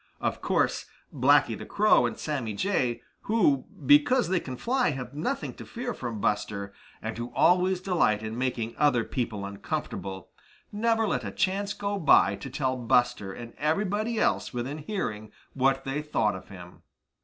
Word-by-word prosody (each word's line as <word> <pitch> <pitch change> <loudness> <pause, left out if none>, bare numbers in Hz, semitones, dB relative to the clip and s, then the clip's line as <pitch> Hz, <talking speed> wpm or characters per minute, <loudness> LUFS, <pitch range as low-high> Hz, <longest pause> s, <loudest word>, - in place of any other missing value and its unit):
Of - - -2
course - - 0 0.3
Blacky - - +4
the - - -8
Crow 205 - +4
and - - -6
Sammy 135 -8 -3
Jay, 125 - 0 0.2
who, 175 - +2 0.2
because 150 - +5
they 185 -1 +2
can 130 -5 -7
fly, 250 - +1
have 130 -3 -5
nothing 250 - -3
to - - -10
fear 245 0 -5
from 115 -4 -5
Buster, 100 -1 -1 0.3
and - - -3
who 120 +1 -5
always 180 +1 +4
delight 170 - +1
in 110 0 -4
making 120 -2 -2
other 140 -6 +3
people 110 -6 -3
uncomfortable, 100 -1 -5 0.4
never 225 +1 +1
let 125 -10 -1
a 100 - -3
chance 195 - -1
go 200 0 -3
by 155 - +5
to 135 - -8
tell 130 -1 -1
Buster 120 -4 +1
and 115 +3 -9
everybody 205 +8 0
else - - +1
within 125 +5 -4
hearing 110 - -4 0.2
what 135 0 +2
they 135 +2 -2
thought 110 -9 0
of 95 - -10
him. 90 -2 -12
135 Hz, 165 wpm, -27 LUFS, 115-190 Hz, 0.4 s, because